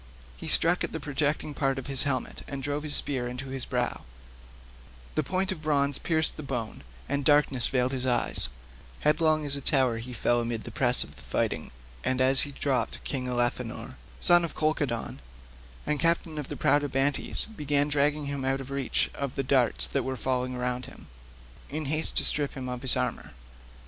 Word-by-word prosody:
He -, -, -9 dB
struck -, -, +2 dB
at -, -, -3 dB
the -, -, -3 dB
projecting 145 Hz, +1 st, -2 dB
part 135 Hz, -1 st, 0 dB
of 135 Hz, -, -5 dB
his 135 Hz, -2 st, +7 dB
helmet 130 Hz, -2 st, -3 dB
and 140 Hz, -1 st, -6 dB
drove 145 Hz, +1 st, -2 dB
the 155 Hz, -, -6 dB
spear 135 Hz, -3 st, +2 dB
into 125 Hz, +2 st, -6 dB
his 135 Hz, -1 st, -4 dB
brow; 125 Hz, -1 st, -2 dB, 1.1 s
the -, -, +1 dB
point 185 Hz, +6 st, -1 dB
of 175 Hz, -5 st, -5 dB
bronze 145 Hz, -3 st, +1 dB
pierced 160 Hz, -1 st, 0 dB
the -, -, -5 dB
bone, 125 Hz, -6 st, -5 dB, 0.3 s
and 140 Hz, +1 st, -1 dB
darkness 140 Hz, -3 st, +3 dB
veiled 125 Hz, -1 st, 0 dB
his 130 Hz, -1 st, -2 dB
eyes; 120 Hz, -1 st, +1 dB, 0.5 s
headlong 155 Hz, 0 st, +2 dB
as 140 Hz, -1 st, 0 dB
a 140 Hz, -, -4 dB
tower 130 Hz, -6 st, +2 dB
he 120 Hz, +3 st, -8 dB
fell 120 Hz, 0 st, +1 dB
amid 115 Hz, -1 st, -3 dB
the -, -, -8 dB
press -, -, +4 dB
of -, -, -13 dB
the -, -, -14 dB
fight, -, -, -1 dB, 0.5 s
and 130 Hz, 0 st, 0 dB
as 130 Hz, +1 st, +6 dB
he 145 Hz, -, -1 dB
dropped 130 Hz, -4 st, -2 dB
King 130 Hz, -2 st, -3 dB
Elephenor, 120 Hz, -1 st, -2 dB, 0.3 s
son 175 Hz, -1 st, +5 dB
of 170 Hz, -, -4 dB
Chalcodon 145 Hz, -6 st, -1 dB, 0.7 s
and 150 Hz, -1 st, -1 dB
captain 165 Hz, -2 st, +1 dB
of 145 Hz, -, -5 dB
the -, -, -6 dB
proud 145 Hz, 0 st, +3 dB
Abantes 140 Hz, 0 st, +1 dB
began 145 Hz, -9 st, 0 dB
dragging 145 Hz, 0 st, +1 dB
him 140 Hz, -1 st, -4 dB
out 135 Hz, +1 st, 0 dB
of 135 Hz, 0 st, -8 dB
reach 140 Hz, -2 st, -1 dB
of 140 Hz, -2 st, -4 dB
the 135 Hz, -, -1 dB
darts 125 Hz, -, +3 dB
that 65 Hz, -, -1 dB
were 130 Hz, 0 st, -4 dB
falling 125 Hz, +1 st, -2 dB
around 125 Hz, 0 st, -3 dB
him, -, -, -13 dB, 0.6 s
in 155 Hz, +2 st, -4 dB
haste 155 Hz, +3 st, +2 dB
to -, -, +7 dB
strip 145 Hz, -1 st, +4 dB
him 130 Hz, -2 st, -5 dB
of 125 Hz, -1 st, -5 dB
his 130 Hz, -2 st, +2 dB
armour. 125 Hz, -, -3 dB
135 Hz, 195 wpm, -27 LUFS, 125-145 Hz, 1.1 s, his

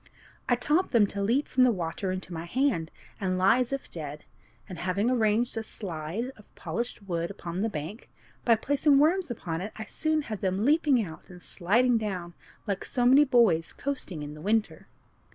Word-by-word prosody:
I 245 Hz, -, +5 dB
taught 300 Hz, +9 st, +1 dB
them 230 Hz, -4 st, +5 dB
to 200 Hz, 0 st, -4 dB
leap 240 Hz, +9 st, +1 dB
from 255 Hz, -, +1 dB
the 255 Hz, -, +7 dB
water 185 Hz, 0 st, -3 dB
into 185 Hz, -1 st, -5 dB
my 165 Hz, 0 st, -5 dB
hand, 220 Hz, -, 0 dB, 0.3 s
and 185 Hz, -2 st, 0 dB
lie 190 Hz, +6 st, +4 dB
as 250 Hz, 0 st, -1 dB
if 275 Hz, 0 st, -3 dB
dead; 150 Hz, -2 st, -7 dB, 0.4 s
and 180 Hz, -, -8 dB
having 200 Hz, +6 st, 0 dB
arranged 230 Hz, 0 st, +2 dB
a -, -, 0 dB
slide 195 Hz, +4 st, -5 dB
of 210 Hz, -, -20 dB
polished 205 Hz, +7 st, -4 dB
wood 170 Hz, -3 st, -2 dB
upon 180 Hz, -2 st, -5 dB
the 225 Hz, -, +1 dB
bank, 165 Hz, -, -6 dB, 0.3 s
by 235 Hz, -, +5 dB
placing 280 Hz, +5 st, +3 dB
worms 335 Hz, +5 st, +3 dB
upon 170 Hz, -8 st, -4 dB
it 205 Hz, +3 st, -5 dB
I 220 Hz, -, -6 dB
soon 315 Hz, +6 st, -1 dB
had 215 Hz, -6 st, -6 dB
them 190 Hz, +2 st, 0 dB
leaping 285 Hz, -5 st, +3 dB
out 160 Hz, -3 st, -11 dB
and 180 Hz, -1 st, -11 dB
sliding 230 Hz, +8 st, +2 dB
down 185 Hz, -5 st, -4 dB, 0.3 s
like 200 Hz, -2 st, -2 dB
so 245 Hz, -2 st, -1 dB
many 270 Hz, +4 st, +7 dB
boys 230 Hz, -, +3 dB
coasting 230 Hz, -, -4 dB
in 145 Hz, 0 st, -6 dB
the 150 Hz, -, -11 dB
winter. 215 Hz, +4 st, 0 dB
210 Hz, 190 wpm, -28 LUFS, 180-250 Hz, 0.4 s, the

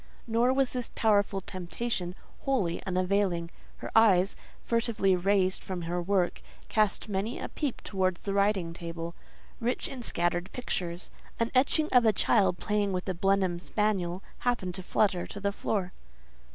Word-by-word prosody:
Nor 235 Hz, +2 st, +3 dB
was 265 Hz, -1 st, +2 dB
this 250 Hz, -2 st, -4 dB
powerful 205 Hz, -3 st, +2 dB
temptation 180 Hz, +1 st, -3 dB, 0.2 s
wholly 205 Hz, -12 st, 0 dB
unavailing: 185 Hz, -2 st, +1 dB, 0.3 s
her -, -, -7 dB
eyes, 195 Hz, -4 st, +5 dB, 0.3 s
furtively 230 Hz, -5 st, +2 dB
raised 190 Hz, 0 st, +2 dB
from 185 Hz, -2 st, -4 dB
her 175 Hz, +1 st, -2 dB
work, 185 Hz, 0 st, 0 dB, 0.3 s
cast 215 Hz, -1 st, +1 dB
many 205 Hz, +4 st, -2 dB
a -, -, -4 dB
peep 285 Hz, -5 st, -3 dB
towards 185 Hz, -2 st, 0 dB
the 200 Hz, -, -3 dB
writing 200 Hz, -4 st, +1 dB
table, 170 Hz, 0 st, -6 dB, 0.5 s
rich 245 Hz, +1 st, 0 dB
in 265 Hz, -3 st, -7 dB
scattered 175 Hz, -4 st, -1 dB
pictures. 180 Hz, -7 st, -3 dB, 0.3 s
An 230 Hz, 0 st, +1 dB
etching 280 Hz, +4 st, +3 dB
of 250 Hz, -2 st, +6 dB
a 220 Hz, -2 st, +4 dB
child 195 Hz, -3 st, +3 dB
playing 205 Hz, +2 st, 0 dB
with 180 Hz, +1 st, -3 dB
a -, -, +1 dB
Blenheim 190 Hz, -1 st, +1 dB
spaniel 190 Hz, -2 st, -1 dB, 0.2 s
happened 235 Hz, -8 st, -1 dB
to 190 Hz, -, -3 dB
flutter 185 Hz, -1 st, +1 dB
to 205 Hz, -, -7 dB
the 200 Hz, 0 st, 0 dB
floor. 195 Hz, -2 st, -2 dB
195 Hz, 150 wpm, -29 LUFS, 180-225 Hz, 0.5 s, of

